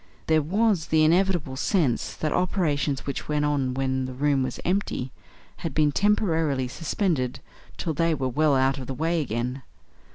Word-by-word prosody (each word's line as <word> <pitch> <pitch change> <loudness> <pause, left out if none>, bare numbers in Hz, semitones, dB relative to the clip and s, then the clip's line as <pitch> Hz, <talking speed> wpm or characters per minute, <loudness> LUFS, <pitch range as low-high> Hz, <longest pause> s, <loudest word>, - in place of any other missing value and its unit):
There 160 -1 +3
was 195 +2 +1
the 155 0 +3
inevitable 170 -4 +2
sense 145 - 0
that 155 - -2
operations 150 -7 0
which 140 - -4
went 150 -1 0
on 135 -4 0
when 130 -1 -1
the 130 0 -6
room 140 0 +2
was 130 -1 -3
empty 180 -8 -1 0.5
had 165 -5 -5
been 150 -1 +3
temporarily 165 -9 +1
suspended 150 - -1 0.4
till 165 - -2
they 165 +2 +1
were 130 -2 -1
well 150 +3 +2
out 135 +1 +2
of 130 - -7
the 135 - -4
way 165 +3 0
again. 125 +1 -3
150 Hz, 165 wpm, -25 LUFS, 130-165 Hz, 0.5 s, There